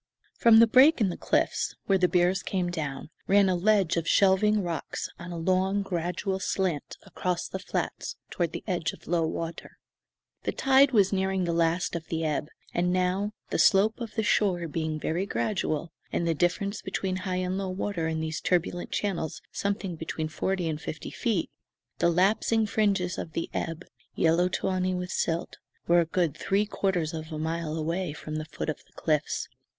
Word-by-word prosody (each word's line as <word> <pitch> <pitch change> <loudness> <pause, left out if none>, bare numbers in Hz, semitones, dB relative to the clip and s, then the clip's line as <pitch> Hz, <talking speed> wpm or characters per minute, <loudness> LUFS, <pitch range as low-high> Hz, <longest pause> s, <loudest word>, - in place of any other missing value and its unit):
From 230 -1 +6
the 230 - +9
break 260 +7 +6
in 210 -4 +3
the 175 - -3
cliffs, - - 0
where 195 -1 +3
the 180 - +4
bears 180 +1 +2
came 180 -2 -1
down, 150 -3 -4 0.2
ran 200 0 +5
a 185 - +2
ledge 195 -2 +3
of 165 0 -1
shelving 200 +2 +4
rocks 170 -3 -3
on 175 +1 -7
a 170 - -5
long, 190 +4 +1
gradual 185 +2 -2
slant 185 -6 -2
across 180 -1 -2
the 190 - -5
flats - - -3 0.2
toward 170 -3 -1
the - - -6
edge 175 -6 -1
of - - -15
low 165 -1 +1
water. 165 +1 -5 0.6
The - - -2
tide 270 +1 +5
was 200 -5 +4
nearing 190 -1 +1
the 170 -1 0
last 170 +1 +1
of 160 -1 -5
the 165 -1 -2
ebb; 150 -1 -1 0.3
and 180 +1 +1
now, 185 +3 0 0.2
the - - 0
slope 215 +4 +4
of 230 -2 -6
the 220 - +1
shore 185 -5 +2
being 155 0 -2
very 175 +6 -1
gradual, 170 -8 -1 0.2
and 170 - 0
the 165 - +3
difference 190 +6 0
between 185 -1 -2
high 185 0 -3
and 185 +1 -1
low 195 -1 -2
water 185 -3 -2
in 160 0 -1
these 160 0 -3
turbulent 175 0 0
channels 180 -6 -2
something 200 -3 -2
between 160 0 -4
forty 180 +2 -1
and 155 -1 -3
fifty 155 - -6
feet, 220 -9 -1 0.5
the 170 - +4
lapsing 205 +5 +3
fringes 200 -4 +1
of 160 - -6
the 165 - -3
ebb, 165 +1 -3 0.3
yellow 170 +2 +3
tawny 185 0 0
with 180 0 -4
silt, 165 +1 -1 0.3
were 175 +1 +5
a 170 - +3
good 165 -2 0
three 200 +5 +1
quarters 180 -6 -1
of 160 0 -6
a 155 - -4
mile 160 0 -2
away 165 +1 -2
from 155 +1 -6
the 155 - -4
foot 155 - -5
of 155 - -1
the - - -29
cliffs. 155 -2 -1
180 Hz, 185 wpm, -28 LUFS, 165-195 Hz, 0.6 s, the